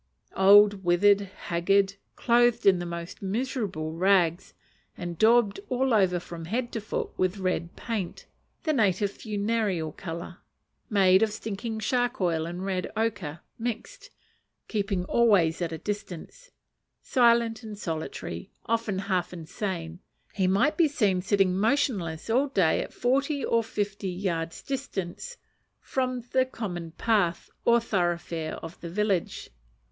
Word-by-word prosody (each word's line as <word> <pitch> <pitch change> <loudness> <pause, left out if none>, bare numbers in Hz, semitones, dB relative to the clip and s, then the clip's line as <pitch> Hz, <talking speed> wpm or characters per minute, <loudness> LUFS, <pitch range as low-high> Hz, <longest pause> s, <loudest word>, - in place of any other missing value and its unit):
Old, 200 +1 +6
withered, 195 +3 +4
haggard, 195 0 0 0.2
clothed 240 -1 +3
in 190 -3 +6
the 175 - -4
most 170 0 -7
miserable 200 - -2
rags, 180 0 +2 0.4
and 175 -1 -5
daubed 225 -2 +4
all 260 0 +1
over 185 -4 +3
from 170 -1 -8
head 240 +7 -2
to 225 - -3
foot 215 - -3
with 185 +2 +1
red 185 -3 -2
paint 215 -7 -4 0.4
(the 310 - +1
native 205 -5 +2
funereal 205 -6 -1
colour), 170 0 -7 0.5
made 190 -3 +5
of 220 -1 +2
stinking 220 +1 -5
shark 245 +2 0
oil 165 -3 0
and 175 +2 -5
red 185 -2 -2
ochre 200 -9 -2 0.2
mixed, 240 - -5 0.6
keeping 200 -4 -1
always 190 -8 +3
at 170 -2 -1
a 160 - -4
distance, 205 - -6 0.5
silent 235 -3 +3
and 215 -3 -8
solitary, 160 - -5 0.2
often 225 -3 0
half 190 -2 -1
insane, 170 0 -5 0.3
he 190 -2 +1
might 225 +11 +2
be 335 - +5
seen 205 -10 +1
sitting 195 -1 +2
motionless 195 - 0
all 255 +5 +2
day 190 - +2
at - - -6
forty 275 +3 0
or 230 0 +2
fifty 205 -2 -3
yards 175 -3 -3
distance 270 - -5 0.4
from 255 -1 -2
the 260 - +4
common 190 -10 -5
path 175 -1 0
or 235 0 +5
thoroughfare 175 -6 -2
of 165 - -11
the 170 - -6
village. 195 -1 -1
200 Hz, 135 wpm, -27 LUFS, 175-230 Hz, 0.6 s, Old